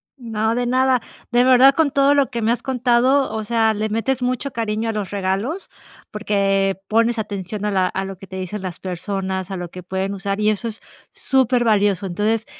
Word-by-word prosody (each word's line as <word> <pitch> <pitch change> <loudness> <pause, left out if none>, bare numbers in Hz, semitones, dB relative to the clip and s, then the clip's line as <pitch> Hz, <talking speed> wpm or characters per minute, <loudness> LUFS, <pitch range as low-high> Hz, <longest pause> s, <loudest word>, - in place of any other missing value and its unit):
No, 225 -3 -2
de 245 0 0
nada, 255 0 +2 0.3
de 245 0 +4
verdad, 260 +2 +6
con 315 -3 +2
todo 280 +1 +4
lo 280 -1 +2
que 235 -2 -3
me 225 +1 +2
has 240 0 -2
contado, 255 +2 +2
o 220 - -2
sea, 225 0 +1
le 215 +1 -1
metes 250 +4 -1
mucho 255 +2 -1
cariño 225 -1 -2
a - - +1
los 210 -3 -4
regalos, 200 - -2 0.4
porque 195 -2 0
pones 230 +2 +2
atención 205 -1 -4
a 210 - 0
la 190 -2 +2
a 190 - -3
lo 195 -1 -7
que 195 - -11
te 190 - -10
dicen 185 +2 -5
las 180 -3 -6
personas, 190 +1 -4
a 190 - -3
lo 175 -1 -6
que 180 +1 -10
pueden 190 +2 -3
usar 195 +1 -3
y 215 0 +3
eso 215 +2 -1
es 220 - -10 0.3
súper 255 -2 +1
valioso, 205 -4 +2
entonces 210 +5 0
215 Hz, 210 wpm, -20 LUFS, 195-245 Hz, 0.4 s, verdad